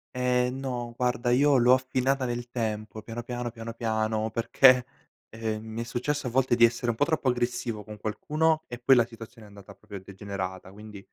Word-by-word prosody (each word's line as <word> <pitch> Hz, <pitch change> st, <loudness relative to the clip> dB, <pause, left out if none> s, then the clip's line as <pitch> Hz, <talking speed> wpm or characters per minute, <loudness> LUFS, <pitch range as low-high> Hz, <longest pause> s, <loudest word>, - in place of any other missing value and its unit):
Ehm, 125 Hz, +1 st, +1 dB
no 120 Hz, -3 st, -4 dB
guarda 125 Hz, -1 st, 0 dB
io 140 Hz, +3 st, +4 dB
l'ho 125 Hz, 0 st, +5 dB
affinata 130 Hz, +1 st, +1 dB
nel 120 Hz, 0 st, -4 dB
tempo 110 Hz, -2 st, -4 dB
piano, 115 Hz, +2 st, -7 dB
piano, 120 Hz, -1 st, -4 dB
piano, 115 Hz, 0 st, -7 dB
piano, 110 Hz, -1 st, -1 dB
perché, 125 Hz, +3 st, +4 dB, 0.4 s
ehm, 110 Hz, -1 st, -4 dB
mi 110 Hz, +1 st, -6 dB
è -, -, -2 dB
successo 125 Hz, +3 st, -2 dB
a -, -, -1 dB
volte 130 Hz, 0 st, +2 dB
di 120 Hz, 0 st, +7 dB
essere 120 Hz, +1 st, -1 dB
un 110 Hz, -, -8 dB
po' 145 Hz, -, +3 dB
troppo 160 Hz, -5 st, 0 dB
aggressivo 120 Hz, -3 st, -2 dB
con 105 Hz, -1 st, -9 dB
qualcuno 155 Hz, +9 st, 0 dB
e 120 Hz, -, -7 dB
poi 130 Hz, +2 st, +5 dB
la 120 Hz, -, +4 dB
situazione 115 Hz, -1 st, -12 dB
è -, -, -16 dB
andata 100 Hz, -1 st, -13 dB
proprio 105 Hz, -1 st, -13 dB
a 95 Hz, -, -10 dB
degenerata. 95 Hz, -1 st, -6 dB
Quindi, 105 Hz, -1 st, -11 dB
120 Hz, 200 wpm, -27 LUFS, 110-125 Hz, 0.4 s, di